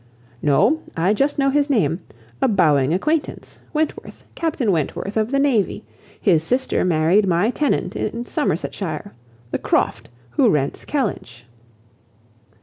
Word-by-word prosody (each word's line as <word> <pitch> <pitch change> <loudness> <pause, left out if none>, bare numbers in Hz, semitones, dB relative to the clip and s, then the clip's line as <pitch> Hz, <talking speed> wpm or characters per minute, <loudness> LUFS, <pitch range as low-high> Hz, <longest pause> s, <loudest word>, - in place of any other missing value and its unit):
"No, 155 - +3 0.2
I 180 +5 +3
just 275 +6 0
know 275 -1 +2
his 290 +1 +1
name. 180 - +1 0.4
A - - +4
bowing 155 - +3
acquaintance. 300 - -2
Wentworth; 310 0 -3
Captain 310 -10 0
Wentworth 175 +4 -2
of 220 0 +1
the 275 - 0
navy. 235 -7 +1 0.4
His 165 -6 +3
sister 255 +9 0
married 180 +4 +3
my 180 +6 +2
tenant 295 +2 -1
in 235 +1 -3
Somersetshire, 205 - -3 0.4
the - - -1
Croft, - - 0 0.2
who 120 - +3
rents 140 -2 -1
Kellynch." 195 - -3
210 Hz, 130 wpm, -21 LUFS, 165-275 Hz, 0.4 s, A